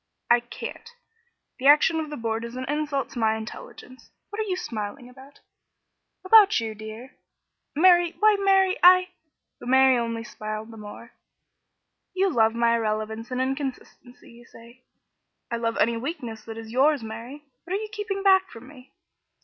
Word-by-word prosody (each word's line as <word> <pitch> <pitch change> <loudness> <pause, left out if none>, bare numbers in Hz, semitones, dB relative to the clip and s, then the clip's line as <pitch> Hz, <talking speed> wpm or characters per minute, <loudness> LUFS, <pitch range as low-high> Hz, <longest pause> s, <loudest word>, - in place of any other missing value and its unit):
"I 240 - +6
can't. 240 - -9 0.7
The 265 - 0
action 300 +3 +5
of 310 -1 -4
the 295 - -6
Board 225 0 -3
is 235 +1 -8
an 255 0 -5
insult 295 -1 -2
to 245 - -7
my 220 -1 +2
intelligence. 235 +3 -10 0.2
What 415 - -6
are 430 -2 -2
you 370 - 0
smiling 225 - -6
about?" 265 +3 -16 0.8
"About 415 - +6
you, 225 -1 -4
dear." 220 +4 -10 0.6
"Mary, 350 +1 +4
why, 430 0 +5
Mary! 385 -1 +3
I 365 +1 +6 0.3
" - - -58
But 245 - -8
Mary 265 -1 +5
only 230 -1 -3
smiled 215 -1 -7
the 225 - -12
more. 215 +2 -11 1.0
"You 380 0 +1
love 225 -4 +2
my 235 0 +2
irrelevance 220 0 -3
and 255 0 -3
inconsistency, 260 -2 -6
you 235 0 -17
say, 235 +2 -17 0.4
" - - -51
"I 235 - -1
love 230 0 -2
any 230 +2 +1
weakness 240 -4 -6
that 225 0 -8
is 225 -1 -9
yours, 275 +1 +2
Mary. 230 +6 -9 0.2
What 355 - -5
are - - -1
you 430 0 -6
keeping 415 -2 -4
back 380 -1 +4
from 230 +2 -13
me?" 260 -2 -16
255 Hz, 175 wpm, -25 LUFS, 230-320 Hz, 1.0 s, I